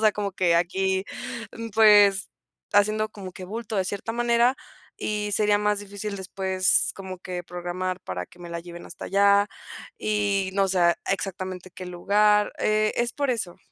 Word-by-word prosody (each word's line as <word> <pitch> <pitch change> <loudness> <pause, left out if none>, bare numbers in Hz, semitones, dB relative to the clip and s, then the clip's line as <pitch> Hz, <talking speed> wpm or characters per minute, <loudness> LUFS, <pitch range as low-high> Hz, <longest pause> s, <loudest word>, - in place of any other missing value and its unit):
sea, 215 -1 +5
como 205 -1 -3
que 180 -3 +2
aquí, 190 +2 +1 0.7
pues, 205 -3 +6 0.4
haciendo 215 +1 +3
como 195 -3 -8
que 185 - -9
bulto 220 +3 -5
de 190 - +1
cierta 200 +3 -4
manera 240 +2 +3 0.4
y 210 -1 -2
sería 210 0 +3
más 210 0 +1
difícil 205 0 -6
después 190 -1 +1
como 190 -2 -8
que 180 -1 -6
programar 180 +1 -4
para 90 - -5
que 180 - -20
me 175 - -8
la 170 - -4
lleven 170 0 -10
hasta - - -9
allá 200 0 +4 0.5
y, 205 -2 0
no 195 0 +3
sé, 175 -2 +3
exactamente 185 -1 -3
qué 185 +1 -9
lugar. 210 +4 +2
Eh, 215 0 +2
es 240 0 0
por 285 -2 -1
eso. 205 -8 -3
195 Hz, 160 wpm, -25 LUFS, 185-210 Hz, 0.7 s, pues